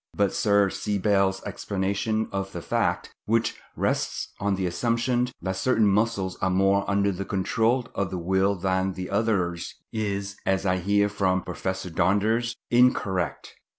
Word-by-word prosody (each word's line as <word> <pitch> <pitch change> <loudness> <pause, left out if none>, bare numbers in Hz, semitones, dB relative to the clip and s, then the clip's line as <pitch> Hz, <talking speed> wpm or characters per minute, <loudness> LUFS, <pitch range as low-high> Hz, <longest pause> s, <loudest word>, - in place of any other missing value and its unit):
But 100 -1 +1
Sir 100 -2 +3
C. 105 -1 -2
Bell's 95 -1 +2
explanation 100 +3 -1
of 95 0 -3
the 85 - -5
fact, - - -1
which 115 +1 +1 0.2
rests - - -1
on 100 0 +1
the 95 -1 -2
assumption 120 +6 0 0.2
that 95 0 -1
certain 115 0 +2
muscles 100 -2 +1
are 95 - +2
more 95 +2 +2
under 100 0 +2
the 95 +1 -4
control 115 +6 0
of 100 -2 -1
the 90 - -4
will 95 +3 +1
than 95 0 0 0.2
others 100 -5 0 0.2
is, 100 -2 -2
as 95 0 0
I 90 -1 +2
hear 100 +3 +2
from 95 -2 0
Professor 95 +2 -4
Donders, 110 +7 +1 0.2
incorrect. 115 -7 +1
100 Hz, 150 wpm, -26 LUFS, 95-105 Hz, 0.2 s, Sir